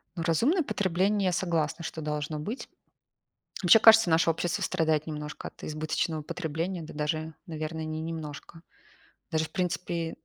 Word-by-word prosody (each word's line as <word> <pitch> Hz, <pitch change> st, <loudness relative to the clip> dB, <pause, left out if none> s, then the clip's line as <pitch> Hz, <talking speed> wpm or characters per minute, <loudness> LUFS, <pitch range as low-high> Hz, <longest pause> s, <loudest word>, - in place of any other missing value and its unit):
Ну, 165 Hz, -, -3 dB
разумное 240 Hz, -, +3 dB
потребление, 195 Hz, -, +1 dB
я 180 Hz, -, +2 dB
согласна, 170 Hz, -2 st, -1 dB
что 160 Hz, -, -5 dB
должно 150 Hz, 0 st, -3 dB
быть. 215 Hz, -, -5 dB, 0.9 s
Вообще, 180 Hz, +5 st, +8 dB
кажется, 225 Hz, -4 st, +8 dB
наше 165 Hz, +1 st, +4 dB
общество 165 Hz, +1 st, -1 dB
страдает 155 Hz, -1 st, +1 dB
немножко 150 Hz, -1 st, -5 dB
от -, -, -19 dB
избыточного 155 Hz, +1 st, -2 dB
потребления. 165 Hz, +3 st, -3 dB
Да, 155 Hz, -, -9 dB
даже, 155 Hz, +1 st, -2 dB
наверное, 160 Hz, 0 st, -4 dB
не 155 Hz, 0 st, -4 dB
немножко, 160 Hz, 0 st, -7 dB, 0.7 s
даже, 160 Hz, 0 st, +1 dB
в -, -, -12 dB
принципе, 175 Hz, -2 st, -2 dB
160 Hz, 145 wpm, -28 LUFS, 155-180 Hz, 0.9 s, Вообще